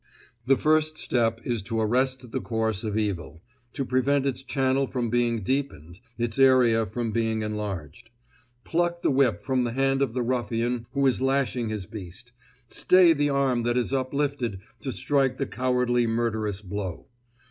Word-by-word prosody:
The 135 0 +5
first 155 0 +2
step 115 -4 0
is 120 -3 -2
to 115 +3 -3
arrest 130 +2 0
the - - -2
course 110 -2 -1
of 110 -1 -2
evil, 90 -6 -3 0.3
to 135 - -3
prevent 130 +2 +1
its 135 -1 -1
channel 135 0 0
from 120 -3 -2
being 120 -3 +1
deepened, 95 - -3 0.2
its 120 0 -2
area 125 -4 +5
from 115 +3 -3
being 110 -1 0
enlarged. 105 -5 -5 0.5
Pluck 175 0 -1
the - - +3
whip 130 -6 +2
from 130 +3 0
the 120 -1 -2
hand 135 +1 +1
of 130 -4 0
the 125 - 0
ruffian 120 -1 -1
who 140 0 +1
is 130 -1 +2
lashing 135 -3 0
his 105 -3 -4
beast; 100 +4 -9 0.4
stay 180 +5 +5
the 145 -1 +1
arm 135 -3 +1
that 120 +1 0
is 125 +2 0
uplifted 130 -5 -1 0.2
to 130 - -4
strike 135 -1 +1
the 135 - -1
cowardly 125 -2 +1
murderous 110 -3 -1
blow. 95 -2 -5
120 Hz, 165 wpm, -26 LUFS, 110-135 Hz, 0.5 s, The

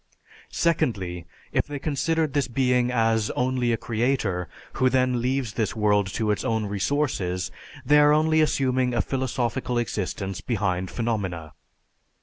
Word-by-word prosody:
Secondly, 95 - -1 0.2
if - - 0
they 145 0 -5
considered 155 +1 0
this 145 -2 +1
being 125 0 +2
as 115 -3 +1
only 125 -1 +1
a 115 - +1
creator, 110 -7 -1 0.2
who 130 - +2
then 125 -1 +1
leaves 130 -3 -1
this 110 -3 -1
world 105 -2 +2
to 110 -2 0
its 105 - -1
own 110 -4 0
resources, 100 -4 -1 0.3
they 150 +3 +6
are 145 0 +6
only 155 +1 +3
assuming 130 -4 +1
a 115 - +3
philosophical 125 -1 -2
existence 100 -4 -3
behind 95 -6 -1
phenomena. 95 -9 -3
120 Hz, 135 wpm, -25 LUFS, 105-130 Hz, 0.3 s, they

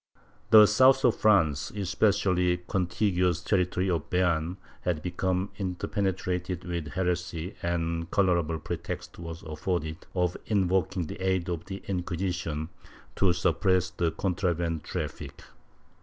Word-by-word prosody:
* 105 - -33
The 110 -1 +10
south 130 +5 +5
of 120 - +4
France, 80 -10 +3
and - - -11
especially 90 -2 +2
the 90 - -11
con 90 -1 0
tiguous 90 -3 +1
territory 90 -1 +1
of 85 -3 -2
Beam, 90 -1 +1 0.2
had 85 -5 -1
become 95 +2 -1
interpenetrated 90 -1 -2
with 85 -3 -4
heresy 90 +1 -2
and 85 -1 -1
a - - -6
colorable 85 -4 +1
pretext 80 - -6
was 85 -1 -7
afforded 80 +1 -3
of 90 -1 +1
invoking 95 -3 +1
the 95 - -7
aid 95 -1 0
of 85 0 -4
the 95 0 -7
Inquisition 90 -4 -2 0.5
to 95 -2 +3
suppress 90 +1 +1
the 85 -2 0
contraband 85 -2 -1
traffic. - - -5
90 Hz, 135 wpm, -28 LUFS, 85-95 Hz, 0.5 s, The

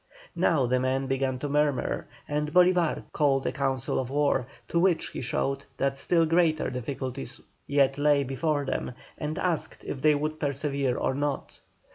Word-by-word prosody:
Now 145 -6 +3
the 125 +1 +2
men 130 +1 0
began 135 -1 0
to 145 - -4
murmur, 145 -2 0 0.2
and 150 0 -1
Bolívar 180 -1 +3
called 135 -2 +2
a - - +1
council 135 -1 -1
of 130 -2 -3
war, 140 -3 +1 0.2
to 170 - +1
which 175 -2 +2
he - - -6
showed 135 +2 -1
that 135 0 0
still 165 +4 +2
greater 160 -3 +2
difficulties 130 +1 -5 0.3
yet 140 -1 +2
lay 145 -1 +4
before 145 +2 -1
them, 130 - -2 0.3
and 150 +1 -3
asked 175 -4 -1
if 135 - -5
they 155 -1 +5
would 155 +2 -2
persevere 140 -3 0
or - - 0
not. 145 0 -3
140 Hz, 165 wpm, -27 LUFS, 135-155 Hz, 0.3 s, they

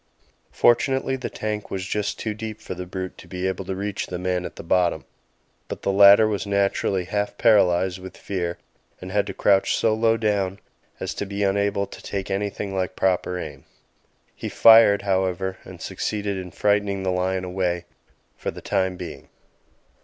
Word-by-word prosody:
Fortunately 130 +2 +2
the 130 -2 -5
tank 105 -1 -4
was 95 -1 -4
just 105 +1 -2
too 110 - -3
deep 110 0 -6
for 110 - -6
the 90 0 -7
brute 95 0 -6
to - - -13
be 90 0 -4
able 95 0 -3
to 95 - -3
reach 100 +1 -3
the 90 - -4
man 90 0 -1
at - - -7
the - - -9
bottom; 85 -2 +1 0.6
but - - -7
the 100 - +1
latter 100 +2 +8
was 100 -4 -2
naturally 100 -1 +1
half 105 +3 -2
paralysed 95 -5 +3
with 95 0 -10
fear 90 -3 -3 0.4
and 90 0 -8
had 105 +1 +1
to - - -4
crouch 100 -1 +3
so 110 - +2
low 115 +1 +2
down 100 -3 0 0.4
as - - -3
to 100 - -4
be 100 +1 -2
unable 100 0 +1
to - - -12
take 100 0 -4
anything 100 0 -3
like 95 -1 -2
proper 90 -1 0
aim. - - -7 0.7
He - - -5
fired, 110 -3 +7
however, 95 -1 -1
and - - -11
succeeded 105 -1 -3
in 95 -1 -6
frightening 100 +1 0
the 95 - 0
lion 95 +1 -1
away 90 -1 -2 0.5
for - - -4
the - - -7
time 95 -1 0
being. 90 -2 -8
95 Hz, 180 wpm, -23 LUFS, 95-105 Hz, 0.7 s, latter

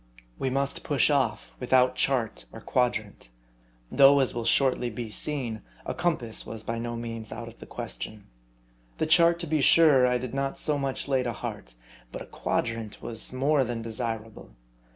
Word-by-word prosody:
We 135 - 0
must 140 +1 -1
push 145 +1 +2
off 125 -7 0
without 125 0 +3
chart 125 - 0
or - - -9
quadrant; 110 - -1 0.6
though, 140 +1 +7
as 135 - +2
will 120 -1 -3
shortly 130 -2 +2
be 115 0 -6
seen, 120 -3 -2 0.2
a - - -2
compass 140 -11 -1
was 110 -1 -7
by 115 +1 -3
no 120 0 -4
means 115 -2 -6
out 115 0 -6
of 115 - -12
the - - -11
question. 100 - -6 0.7
The - - 0
chart, 170 +1 +5
to - - -3
be 155 -2 0
sure, 140 -4 +6
I 125 0 +2
did 125 0 -6
not 135 0 -2
so 150 -2 -1
much 135 0 -3
lay 135 -2 +2
to 120 -2 -2
heart; 95 - -7 0.4
but - - -6
a - - -12
quadrant 115 -2 -3
was 115 -2 -4
more 135 +2 +2
than 120 -2 -4
desirable. 110 - -5
125 Hz, 175 wpm, -27 LUFS, 115-140 Hz, 0.7 s, though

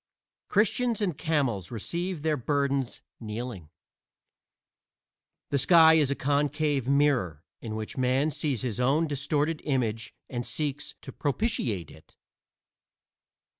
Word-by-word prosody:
Christians 230 +2 +2
and 190 -7 0
camels 135 - 0
receive 170 - -4
their 155 -1 +2
burdens 140 -1 -1 0.2
kneeling. 110 -6 -6 1.8
The 140 - +2
sky 160 +1 +7
is 155 -4 +4
a 140 - 0
concave 145 -1 0
mirror 135 - +2 0.2
in 110 -2 -5
which 110 +3 -6
Man 130 +4 +2
sees 140 -6 -2
his 120 -2 -2
own 140 +6 +3
distorted 150 +2 -1
image 120 -5 -1
and 120 -2 -4
seeks 145 +1 -4
to 135 - -8
propitiate 130 - -1
it. 80 +1 -18
140 Hz, 115 wpm, -28 LUFS, 120-155 Hz, 1.8 s, sky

